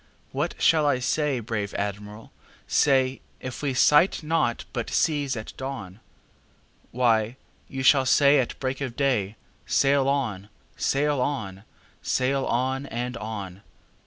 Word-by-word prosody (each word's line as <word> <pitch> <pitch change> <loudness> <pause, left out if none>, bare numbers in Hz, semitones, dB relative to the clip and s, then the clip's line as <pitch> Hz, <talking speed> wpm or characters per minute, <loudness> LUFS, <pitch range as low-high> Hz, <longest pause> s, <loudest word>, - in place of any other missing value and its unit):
"What - - -2
shall 155 -2 +4
I 145 - +3
say, 135 +1 0
brave 105 -2 -4
Admiral, 105 +2 -5 0.4
say, 135 -2 +2 0.2
If 130 -1 -7
we 140 -3 -1
sight 150 +7 +4
naught 150 -7 0
but - - -3
seas 145 -5 0
at 110 - -7
dawn?""Why, 115 0 -4 0.3
you 135 0 -5
shall 135 0 +5
say 140 +2 +5
at 125 - -2
break 130 +1 -3
of 130 -4 -4
day,'Sail 135 +3 0
on! 110 -8 -2 0.3
sail 145 -1 +1
on! 105 -8 -3 0.4
sail 135 +1 0
on! 130 +3 -1
and 125 0 -4
on! 100 -4 -6
130 Hz, 125 wpm, -25 LUFS, 110-140 Hz, 0.4 s, shall